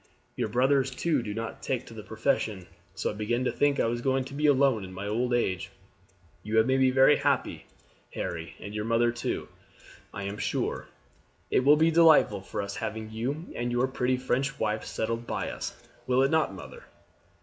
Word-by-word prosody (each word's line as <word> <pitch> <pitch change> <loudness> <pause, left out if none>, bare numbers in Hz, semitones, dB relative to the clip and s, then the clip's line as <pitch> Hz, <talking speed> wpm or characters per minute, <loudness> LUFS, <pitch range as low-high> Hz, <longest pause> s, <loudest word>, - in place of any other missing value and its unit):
Your - - -1
brothers, 130 +4 +2
too, 145 +2 0
do 110 -3 -5
not 115 +2 -5
take 130 -3 -2
to - - -12
the 110 - -8
profession, 110 -3 -1 0.3
so - - -1
I - - -7
began 110 +4 -1
to 125 - +1
think 145 -1 +1
I - - +3
was 120 +1 -1
going 130 +1 +1
to 135 - -10
be 150 +2 +1
alone 135 -6 +3
in 95 - -8
my 95 +2 -6
old 120 +4 -1
age. 95 -6 0 0.7
You 110 +3 -2
have 110 - +6
made 130 +1 +2
me 130 -1 +5
very 135 +3 +5
happy, - - 0 0.5
Harry, 85 -1 -4
and 100 - -8
your 105 0 -3
mother 115 +1 +2
too, 120 -1 -3 0.6
I 100 - -6
am 100 +2 -5
sure. - - -2 0.6
It - - +4
will 145 +3 +6
be 160 +2 +4
delightful 160 - +5
for 100 - -4
us 100 0 -5
having 110 0 -4
you 135 +9 -3
and 120 0 -2
your 120 +2 +2
pretty 130 -1 0
French 130 +2 -1
wife 110 0 -1
settled 115 +1 -3
by - - -2
us; - - -6 0.3
will 130 +1 +3
it 135 - +2
not, 160 -8 +2
mother?" 95 -2 -11
120 Hz, 200 wpm, -28 LUFS, 110-135 Hz, 0.7 s, have